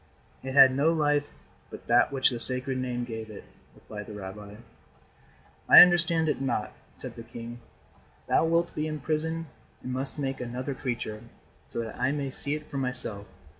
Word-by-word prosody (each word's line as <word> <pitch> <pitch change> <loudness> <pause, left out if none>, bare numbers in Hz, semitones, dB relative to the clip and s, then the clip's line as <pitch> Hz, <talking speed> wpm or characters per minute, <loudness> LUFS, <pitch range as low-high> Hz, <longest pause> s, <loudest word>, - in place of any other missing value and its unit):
"It 130 0 -5
had 135 -2 +8
no 145 +4 +3
life 145 -2 +1 0.4
but - - -11
that 120 +3 +4
which 135 -1 +2
the 120 - -4
Sacred 130 +1 -1
Name 125 -1 -2
gave 110 -2 -6
it," 105 - -10 0.3
replied 105 -1 -9
the 105 - -8
rabbi. 100 +1 -8 1.1
"I - - +12
understand 170 -2 +3
it 150 - -1
not," 120 -5 -2 0.2
said - - -9
the - - -8
king. 115 +1 -9 0.7
"Thou - - +3
wilt 170 +1 +1
be 155 +1 -2
imprisoned 155 +2 -2 0.4
and 125 - -4
must 135 +3 -3
make 135 -2 -3
another 125 +3 -4
creature, 120 -5 -4 0.5
so - - -4
that 115 0 -7
I 130 +2 +1
may 140 -2 -3
see 145 +3 -3
it 150 0 -7
for 140 - -4
myself. 120 -6 -4
130 Hz, 170 wpm, -28 LUFS, 115-150 Hz, 1.1 s, I